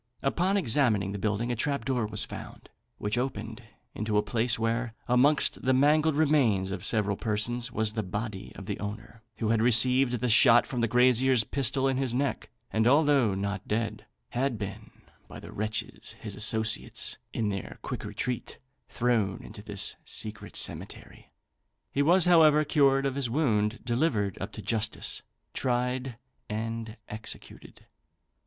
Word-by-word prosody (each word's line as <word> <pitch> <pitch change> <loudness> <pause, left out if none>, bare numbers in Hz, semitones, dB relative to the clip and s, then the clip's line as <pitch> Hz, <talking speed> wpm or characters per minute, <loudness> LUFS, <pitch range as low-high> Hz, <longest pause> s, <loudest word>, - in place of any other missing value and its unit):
Upon 180 +8 +1
examining 115 - +2
the 100 - -5
building 110 +4 -1
a - - -1
trap 140 +4 -1
door 125 -5 0
was 105 0 -1
found, - - -10 0.3
which 105 +4 -1
opened 130 +1 -4 0.3
into 105 0 -1
a 105 - +3
place 115 +1 0
where, 115 0 -1
amongst 135 +4 +3
the 130 0 +2
mangled 150 +3 +3
remains 130 -11 +2
of 95 -2 -5
several 105 -3 +2
persons, 115 +3 -2
was 110 0 +1
the 110 - -1
body 105 +1 -5
of 100 - -9
the 100 0 -4
owner, 110 +2 -7 0.2
who 110 - -1
had 115 -1 +2
received 125 +2 +4
the 125 +1 -1
shot 115 +1 +6
from 125 -3 -3
the 115 - +2
grazier's 125 +1 +4
pistol 135 +2 +1
in 135 -1 0
his 130 -3 0
neck; 140 +1 -2 0.2
and 110 +1 +2
although 140 -6 +4
not 100 0 -4
dead, 110 +1 -2 0.2
had 125 -1 -1
been, 105 +1 -7 0.4
by - - -10
the - - -11
wretches 110 +1 -3
his - - -8
associates, 110 0 +1
in 110 -2 -1
their 100 -1 -5
quick - - -5
retreat, 125 -2 -4 0.3
thrown 115 -5 0
into 105 0 -11
this 105 -2 -2
secret 110 0 -6
cemetery. - - -4 0.6
He 140 - 0
was, 175 +4 +5
however, 155 -3 +5
cured 140 -2 +3
of 135 - 0
his 135 -3 -2
wound, 115 -5 0
delivered 120 - 0
up 100 +2 -4
to 105 - -8
justice, 110 -1 -1 0.3
tried, 125 0 -1 0.3
and 115 +1 -4
executed. 110 +1 -8
115 Hz, 155 wpm, -28 LUFS, 105-135 Hz, 0.6 s, shot